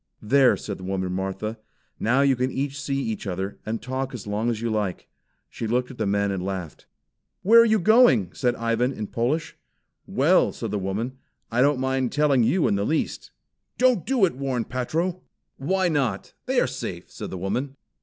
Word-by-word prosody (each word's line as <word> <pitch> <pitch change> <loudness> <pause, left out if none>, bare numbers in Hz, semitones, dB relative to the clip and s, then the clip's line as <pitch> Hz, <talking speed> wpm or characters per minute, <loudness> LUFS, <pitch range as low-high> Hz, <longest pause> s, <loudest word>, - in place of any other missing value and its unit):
"There!" 130 +3 +4
said 100 -3 -6
the - - -9
woman 95 -1 -2
Martha. 95 +4 -3 0.4
"Now 125 +5 +2
you 140 -1 +4
can 125 +1 -1 0.2
see 140 0 -3
each 110 -5 -3
other, 95 +2 -4
and 110 +1 -2
talk 130 +1 -3
as 115 - -8
long 105 +3 -1
as 115 -2 -1
you 115 0 -2
like." 105 -4 -2 0.4
She 115 - -5
looked 125 +3 0
at 125 - -13
the 110 - 0
men 100 0 +1
and 95 -2 -3
laughed. 95 -4 -5 0.6
"Where 230 +4 +8
are - - +5
you 220 -1 +4
going?" 205 - +5
said 125 -1 0
Ivan 115 +3 0
in 110 - -4
Polish. 125 +10 -1 0.5
"Well," - - +3
said - - -5
the 105 - -1
woman, 110 +7 -3 0.3
"I 120 +2 +2
don't 145 +1 +4
mind 130 -1 0
telling 145 -3 +3
you 170 +9 +2
in - - +2
the 100 0 0
least." 155 +9 -2 0.5
"Don't 250 -7 +3
do 255 -7 +3
it!" 170 - -2
warned 130 -4 -2
Patro. 165 +8 -2 0.4
"Why 185 +7 +1
not? 135 - -1
They - - +2
are - - +3
safe," - - -6
said - - -7
the 95 - -5
woman. 125 +10 -3
125 Hz, 195 wpm, -24 LUFS, 105-140 Hz, 0.6 s, Where